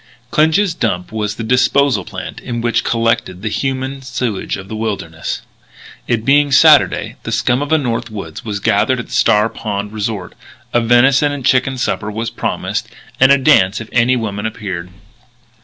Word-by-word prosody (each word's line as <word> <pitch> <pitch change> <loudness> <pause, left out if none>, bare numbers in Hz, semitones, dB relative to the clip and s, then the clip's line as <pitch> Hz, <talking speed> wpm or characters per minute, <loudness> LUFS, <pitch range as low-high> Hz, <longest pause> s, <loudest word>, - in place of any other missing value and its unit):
II - - -28
Clinch's 165 +5 +3
dump 90 - -2
was 105 -1 -2
the 115 - -5
disposal 130 +3 +2
plant - - -7
in 120 -1 -5
which 120 0 0
collected 115 -5 -1
the 110 - -1
human 135 +3 -3
sewage 125 -5 -3
of 95 0 -9
the 110 - -6
wilderness. 100 -7 -4 0.6
It 115 -2 -1
being 145 +1 +4
Saturday, - - +4
the - - -6
scum 125 +3 +1
of 145 - -3
the 160 - +4
North 120 -4 -2
Woods 100 -7 -8
was 105 -2 -4
gathering 100 +7 +2
at 120 - -5
the - - -18
Star 105 -1 +3
Pond 105 -2 -5
resort. 105 -4 -4 0.4
A 120 - +3
venison 130 +5 +4
and 140 -3 -5
chicken 130 +1 +2
supper 110 -3 -2
was 115 +2 -4
promised - - -3 0.3
and 135 +1 +6
a 140 - +7
dance 125 -9 +3
if 115 - -9
any 125 +1 +3
women 105 -3 -3
appeared. 95 -5 -6
115 Hz, 175 wpm, -16 LUFS, 105-130 Hz, 0.6 s, a